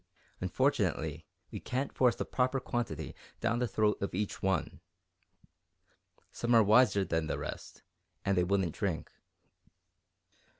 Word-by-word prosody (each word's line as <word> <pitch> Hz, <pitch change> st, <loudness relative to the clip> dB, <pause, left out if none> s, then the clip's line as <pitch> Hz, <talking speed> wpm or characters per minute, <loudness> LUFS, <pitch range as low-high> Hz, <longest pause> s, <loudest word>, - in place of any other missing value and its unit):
"Unfortunately, 80 Hz, 0 st, 0 dB, 0.2 s
we -, -, -5 dB
can't 130 Hz, +3 st, -3 dB
force 125 Hz, -3 st, +3 dB
the -, -, -3 dB
proper 130 Hz, +1 st, +1 dB
quantity 115 Hz, -, -3 dB, 0.3 s
down 115 Hz, 0 st, 0 dB
the 125 Hz, -, +1 dB
throat 105 Hz, 0 st, +1 dB
of 100 Hz, -, -2 dB
each 105 Hz, +1 st, -2 dB
one. 95 Hz, -3 st, -1 dB, 1.5 s
Some 120 Hz, 0 st, +1 dB
are 115 Hz, -, +7 dB
wiser 105 Hz, -2 st, +5 dB
than 80 Hz, -3 st, -1 dB
the -, -, -2 dB
rest -, -, -7 dB, 0.4 s
and 100 Hz, -, +2 dB
they 90 Hz, -, +3 dB
wouldn't 95 Hz, -3 st, +1 dB
drink." 90 Hz, -6 st, -3 dB
100 Hz, 130 wpm, -32 LUFS, 90-120 Hz, 1.5 s, are